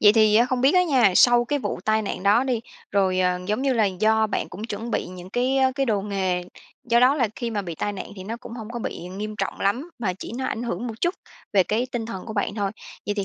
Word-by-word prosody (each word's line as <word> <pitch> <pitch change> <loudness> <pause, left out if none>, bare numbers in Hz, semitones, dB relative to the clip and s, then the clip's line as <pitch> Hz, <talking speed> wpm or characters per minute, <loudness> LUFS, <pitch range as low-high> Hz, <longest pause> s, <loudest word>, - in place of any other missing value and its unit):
Vậy 210 -1 +7
thì 215 -2 +5
á 240 +2 +5
không 255 -1 -1
biết 270 +6 +4
á 360 - +6
nha, 255 - +4
sau 240 -1 +6
cái 290 +4 0
vụ - - -3
tai 220 0 +2
nạn 190 - -4
đó 210 +5 +4
đi, 250 -4 0 0.3
rồi, 190 -2 +2
ờ, 180 0 +2
giống 215 +5 0
như 270 -1 +2
là, 225 -3 +3
do 215 +3 +2
bạn - - -2
cũng 205 +4 -8
chuẩn 225 +1 -5
bị - - -1
những 180 0 -10
cái, 255 +3 +1
ơ, 260 -1 +3
cái 270 -1 0
đồ 210 -3 +1
nghề, 190 -3 -1 0.4
do 235 0 +3
đó 255 +3 +6
là 245 -7 +1
khi 235 -1 -3
mà 210 -3 -2
bị 170 -3 -5
tai 205 +6 -2
nạn 190 - -6
thì 185 - -8
nó 225 +3 -4
cũng 235 - -11
hông 230 -1 -7
có 240 - -4
bị 180 -5 -5
nghiêm 210 +3 -5
trọng 195 - -3
lắm, 245 - 0
mà 200 -6 -1
chỉ 190 - -8
nó 265 - -2
ảnh 230 - -3
hưởng 235 0 -3
một 225 - -4
chút 345 +2 +1 0.4
về 195 -2 +5
cái 225 +7 -1
tinh 230 -2 -2
thần 195 -4 -6
của 220 - -5
bạn 205 -1 -1
thôi. 200 -3 -1 0.4
Vậy 205 - 0
thì 200 -2 -1
220 Hz, 285 wpm, -24 LUFS, 200-245 Hz, 0.4 s, Vậy